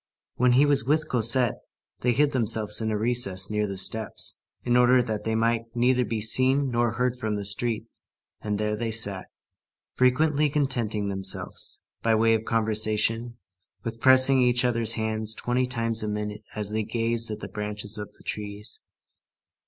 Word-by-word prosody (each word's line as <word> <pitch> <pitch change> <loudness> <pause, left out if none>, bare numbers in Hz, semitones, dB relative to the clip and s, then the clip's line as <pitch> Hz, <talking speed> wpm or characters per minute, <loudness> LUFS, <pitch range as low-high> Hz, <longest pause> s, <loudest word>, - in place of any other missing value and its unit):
When 125 0 +2
he 135 +4 +5
was 145 -3 +2
with 150 +5 0
Cosette, 120 0 +2 0.4
they 125 - +1
hid 145 +3 +2
themselves 110 -4 +2
in 110 - -1
a 110 - -1
recess 105 -4 0
near 105 0 -1
the 100 -1 -5
steps, 110 +3 +1 0.2
in 120 0 +1
order 125 +1 +5
that 110 -3 -5
they 110 0 -1
might 115 0 0
neither 125 +1 +2
be 110 -1 -3
seen 130 +4 +2
nor 120 -1 0
heard 125 +1 -1
from 110 -2 -2
the 100 -1 -4
street, 110 +3 0 0.6
and 105 -1 -3
there 105 0 -1
they 115 +1 -3
sat, 100 -4 0 0.7
frequently 145 +4 +2
contenting 120 -8 -1
themselves, 95 -1 -2 0.2
by 115 -1 +2
way 115 +1 +3
of 110 0 -1
conversation, 110 +1 0 0.5
with 115 0 -6
pressing 130 0 +6
each 125 0 +2
other's 115 -2 +1
hands 110 -1 -1
twenty 125 +1 -1
times 115 -2 -1
a 105 - -3
minute 105 0 -4
as 105 -1 -3
they 110 +1 -1
gazed 115 +1 -1
at 105 - -5
the - - -7
branches 105 0 -4
of 105 - -7
the - - -20
trees. 105 0 -5
115 Hz, 170 wpm, -25 LUFS, 105-125 Hz, 0.7 s, pressing